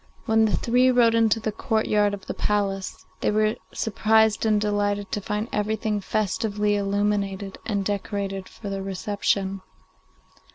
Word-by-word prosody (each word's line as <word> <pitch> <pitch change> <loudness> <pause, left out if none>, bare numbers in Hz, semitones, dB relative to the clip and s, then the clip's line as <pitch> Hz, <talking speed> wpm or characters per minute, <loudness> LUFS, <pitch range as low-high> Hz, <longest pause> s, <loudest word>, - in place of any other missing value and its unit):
When 220 -1 +4
the 215 - +1
three 250 +2 +3
rode 240 -2 +4
into 225 -1 +3
the 215 0 -2
courtyard 210 -2 +1
of 195 - -14
the - - -4
palace, 195 -2 -2
they - - +1
were 215 +1 +2 0.2
surprised 220 0 +2
and 215 -1 +3
delighted 205 -1 -1
to 205 - -2
find 210 +3 -2
everything 210 0 -1
festively 210 +1 0
illuminated 200 -1 -1
and 200 -3 -1
decorated 200 -1 -3
for 200 -3 -8
their 195 0 -3
reception. 195 0 -1
210 Hz, 140 wpm, -24 LUFS, 200-220 Hz, 0.2 s, When